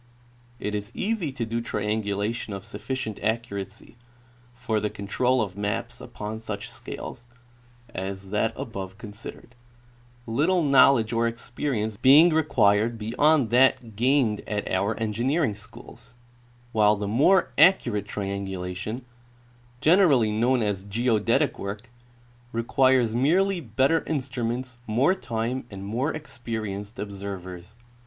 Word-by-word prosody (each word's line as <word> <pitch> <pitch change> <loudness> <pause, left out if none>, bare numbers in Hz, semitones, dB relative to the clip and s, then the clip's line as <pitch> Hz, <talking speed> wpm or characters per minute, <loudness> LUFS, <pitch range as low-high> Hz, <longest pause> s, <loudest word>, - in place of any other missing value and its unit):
It 105 - -3
is 105 0 -4
easy 200 -8 -1
to 120 -3 -3
do 115 +1 -2
triangulation 105 0 -2
of 100 0 -7
sufficient 130 -6 -5
accuracy 105 -1 -4 0.6
for 120 -3 -1
the 105 0 -1
control 125 +6 0
of 95 -3 -6
maps 100 0 -3
upon 105 +1 -6
such 110 -2 -6
scales 120 - -8 0.7
as 95 +1 -5
that 105 +2 +1
above 95 -4 -6
considered, 110 +2 -10 0.7
little 160 +10 +1
knowledge 130 -5 +5
or 115 0 +2
experience 115 -2 -3
being 150 +8 +7
required 115 -7 +3
beyond 125 +4 +2
that 120 -3 +3
gained 120 -2 +2
at 105 -1 -2
our 100 +5 0
engineering 120 +5 0
schools; 115 +3 -14 0.6
while 105 -2 +4
the 105 0 -4
more 135 - +3
accurate 120 - +4
triangulation, 100 +3 -4 0.8
generally 155 - +5
known 120 +3 +2
as 100 -3 -2
geodetic 115 +5 +1
work, 105 +4 -6 0.6
requires 120 0 +2
merely 180 +10 +2
better 135 +6 +1
instruments, 125 -3 -3
more 125 +11 +3
time, 120 -4 -3
and 100 -1 -8
more 125 +9 -1
experienced 110 -7 -5
observers. 95 -1 -7
115 Hz, 115 wpm, -25 LUFS, 105-130 Hz, 0.8 s, being